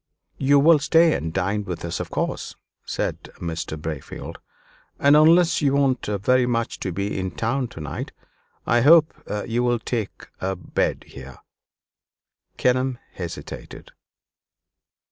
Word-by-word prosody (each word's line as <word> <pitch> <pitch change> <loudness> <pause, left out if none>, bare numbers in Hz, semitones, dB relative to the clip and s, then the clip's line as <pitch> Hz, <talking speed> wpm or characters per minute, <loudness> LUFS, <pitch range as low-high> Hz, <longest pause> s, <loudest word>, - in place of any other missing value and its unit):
"You 140 +1 +4
will 155 +2 +6
stay 165 +2 +4
and 80 - -3
dine 95 +4 -1
with 90 -3 -5
us, 85 - -3
of - - -5
course," - - -3 0.3
said - - -3
Mr. 80 -2 -4
Braefield; 75 -3 -6 0.6
"and 140 +1 +5
unless 165 +3 +5
you 140 -2 +2
want 135 -3 +1
very 120 +5 +2
much 115 -1 -1
to 95 - -3
be 100 +3 -3
in 95 0 -2
town 120 +7 -1
to 100 - -12
night, 75 -2 -5 0.5
I 120 0 +3
hope 160 +3 +6 0.3
you 120 +1 -1
will 120 -1 +2
take 115 -2 -4
a 95 +1 -2
bed 90 - -2
here." 65 -1 -11 1.2
Kenelm 130 0 +1 0.2
hesitated. 85 -3 -8
120 Hz, 135 wpm, -23 LUFS, 95-140 Hz, 1.2 s, will